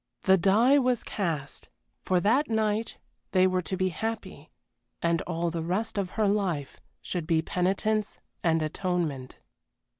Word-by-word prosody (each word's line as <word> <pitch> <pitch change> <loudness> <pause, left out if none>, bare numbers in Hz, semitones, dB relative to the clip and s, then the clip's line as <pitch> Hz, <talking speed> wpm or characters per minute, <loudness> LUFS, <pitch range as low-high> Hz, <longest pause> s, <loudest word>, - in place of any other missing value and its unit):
The 190 - +6
die 215 +10 +4
was 250 -3 +1
cast 160 -8 -3 0.3
for 185 -1 +2
that 255 - +2
night 220 0 0 0.4
they 185 -1 +5
were 185 0 +2
to 185 +2 -3
be 185 0 +1
happy, 220 +6 -5 0.5
and 170 0 +1
all 170 0 -1
the 165 0 -3
rest 185 +7 -1
of 190 -2 -2
her 215 -2 +3
life 185 -9 -1 0.2
should 175 -4 -3
be 160 -1 +2
penitence 200 +5 0 0.3
and 165 -2 +2
atonement. 155 -5 -2
185 Hz, 145 wpm, -28 LUFS, 165-215 Hz, 0.5 s, The